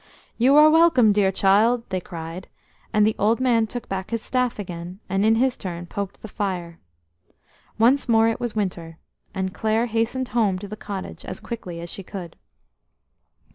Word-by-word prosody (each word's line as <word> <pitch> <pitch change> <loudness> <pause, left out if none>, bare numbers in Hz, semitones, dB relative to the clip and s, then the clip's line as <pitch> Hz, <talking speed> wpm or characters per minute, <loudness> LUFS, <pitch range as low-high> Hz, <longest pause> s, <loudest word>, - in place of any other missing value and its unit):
"You 260 +4 +5
are 300 +1 +8
welcome, 315 -10 +5
dear 200 -2 +3
child," 215 +5 +3
they 185 -1 -2
cried; 170 +1 -8 0.4
and 210 0 +4
the 215 - +1
old 220 +4 +2
man 235 -4 +2
took 240 +1 -6
back 190 -1 -4
his 230 -1 -3
staff 250 -2 0
again, 180 -2 -7
and 195 +1 0
in 220 +1 +4
his 255 +2 +2
turn 175 -3 -6
poked 200 +2 -6
the - - -6
fire. 180 -5 -4 1.0
Once 250 +4 +3
more 225 -1 +5
it 225 - -1
was 240 -2 -4
winter, 170 -6 -3 0.4
and 190 -1 -2
Clare 220 +3 +1
hastened 235 +3 -1
home 210 -6 +1
to 200 +2 -7
the 210 - -7
cottage 200 -3 -7
as - - -6
quickly 185 -8 -7
as 170 - -7
she - - -7
could. 180 -3 -8
210 Hz, 175 wpm, -23 LUFS, 185-230 Hz, 1.0 s, are